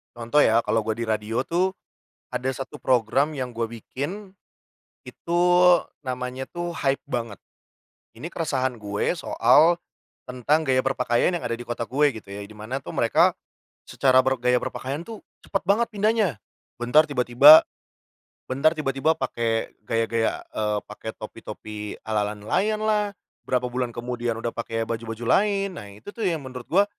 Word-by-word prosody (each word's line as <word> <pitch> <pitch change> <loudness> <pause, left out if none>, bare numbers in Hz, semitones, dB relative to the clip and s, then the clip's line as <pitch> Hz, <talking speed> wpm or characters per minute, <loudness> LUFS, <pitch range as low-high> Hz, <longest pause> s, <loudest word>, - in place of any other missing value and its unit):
Contoh 120 +5 +3
ya, 115 +1 +4
kalo 110 -1 0
gue 110 - 0
di - - -1
radio 110 +2 -1
tuh, 180 +6 0 0.6
ada 130 - -2
satu 135 +2 -5
program 130 +5 +1
yang 130 -2 -4
gue 115 0 -2
bikin, 145 - -6 0.7
itu 170 +1 -2 0.6
namanya 130 -1 -5
tuh 175 0 -4
Hype 135 -4 -1
Banget. 115 -4 -4 0.8
Ini 160 - -8
keresahan 135 -7 -1
gue 105 - -2
soal, 160 +3 +4 0.5
tentang 145 +5 0
gaya 130 -1 +3
berpakaian 125 +2 +1
yang 175 - -2
ada 115 - -2
di 120 - -8
kota 120 -1 -4
gue 145 +2 +3
gitu 100 - -26
ya, 100 +1 -6
di 100 - -12
mana 110 +6 -6
tuh - - -7
mereka - - +4 0.5
secara 130 -1 +3
ber 130 0 +1
gaya 125 +1 +3
berpakaian 140 +5 -4
tuh 225 +1 -8 0.3
cepat 195 - -1
banget 225 +4 +3
pindahnya. 210 - +1 0.4
Bentar 125 +6 +4
tiba-tiba 135 +3 +8 0.8
bentar 140 +5 +2
tiba-tiba, 150 +1 0
pake 115 -5 -2
gaya-gaya, 115 +1 -1
eee, 105 -1 0
pake 105 +1 -7
topi-topi 105 -1 -8
ala-ala 105 -1 -1
nelayanlah, 210 - 0 0.4
berapa 125 -1 +1
bulan 125 0 -2
kemudian 120 -1 -3
udah 115 0 -3
pake 115 -1 -3
baju-baju 115 0 -5 0.2
lain. 200 -2 -1
Nah, 105 -10 -9
itu 105 - -12
tuh 230 - -6
yang 175 -5 +1
menurut 125 -1 -7
gua, 195 +4 +5
125 Hz, 150 wpm, -24 LUFS, 115-155 Hz, 0.8 s, tiba-tiba